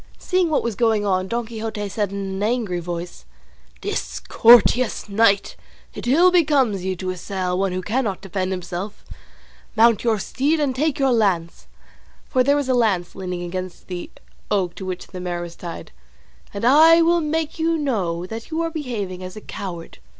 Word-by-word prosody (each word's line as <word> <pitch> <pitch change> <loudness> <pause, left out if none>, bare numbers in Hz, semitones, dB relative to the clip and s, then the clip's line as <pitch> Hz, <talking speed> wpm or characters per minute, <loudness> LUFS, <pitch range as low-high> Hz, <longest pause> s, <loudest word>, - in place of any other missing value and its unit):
Seeing 365 -2 +1
what 310 - +1
was 235 - -1
going 220 -1 +1
on, 185 -1 +1
Don 235 +3 -2
Quixote 220 -2 -5
said 205 0 -2
in 200 - -5
an 195 0 -4
angry 215 -5 0
voice, 175 0 -6 0.6
"Discourteous 240 +1 +3
knight, 200 -1 +2 0.4
it - - -7
ill 340 +8 +5
becomes 280 - +2
you 190 0 -1
to 185 +1 -3
assail 185 0 -3
one 195 -1 +1
who 185 0 -3
cannot 215 -2 -1
defend 190 -1 -3
himself; 180 +2 -5 0.7
mount 230 -1 +4
your 230 -2 +2
steed 285 +10 0
and 280 -4 0
take 300 +2 0
your 270 -2 +2
lance" 185 -7 0 0.6
(for 255 -3 +2
there 280 +2 +3
was 285 -2 -1
a 260 - +2
lance 205 -8 +1
leaning 180 -2 -5
against 185 +1 -6
the 180 -1 -5 0.4
oak 190 -4 0
to 190 - -8
which 185 -1 -5
the 185 - -9
mare 175 -1 -3
was 170 -1 -9
tied), 170 -1 -8 0.6
"and 200 +2 -4
I 320 +6 +7
will 340 +1 +3
make 315 +1 -2
you 330 0 +1
know 190 - -1
that 225 +4 -7
you 320 - -2
are 330 - -2
behaving 215 - -4
as 185 0 -8
a 215 - -8
coward." 175 -6 -7
210 Hz, 180 wpm, -22 LUFS, 185-260 Hz, 0.7 s, I